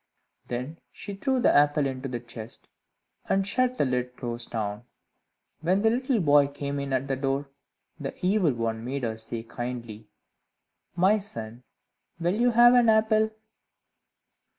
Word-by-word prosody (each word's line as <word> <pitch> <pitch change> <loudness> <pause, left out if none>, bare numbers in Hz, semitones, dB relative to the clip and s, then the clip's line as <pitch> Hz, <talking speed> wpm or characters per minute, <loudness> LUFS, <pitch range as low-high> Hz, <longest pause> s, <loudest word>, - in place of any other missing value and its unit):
Then 125 +7 -5
she 205 - -8
threw 260 +6 0
the - - +4
apple 145 0 +4
into 135 0 -3
the 120 -1 -3
chest, 115 -1 -9 0.6
and 195 0 +2
shut 255 +4 +1
the - - +2
lid 125 -1 -2
close 120 -1 -3
down. 105 0 -4 0.7
When 185 +5 +1
the 220 - +5
little 255 0 +1
boy 145 -4 +5
came 140 0 -4
in 140 -1 -4
at 130 +1 0
the 135 - 0
door, 135 +1 -2 0.5
the - - -5
Evil 185 -6 +3
One 115 -1 -2
made 135 +2 -4
her 110 -2 -1
say 115 +1 -5
kindly, 115 -3 -6 0.9
"My 190 +5 +4
son, 115 - -8 0.6
will 175 +2 +1
you 240 +4 +3
have 240 +1 +7
an 245 -2 +5
apple?" 220 0 +3
140 Hz, 150 wpm, -27 LUFS, 120-200 Hz, 0.9 s, have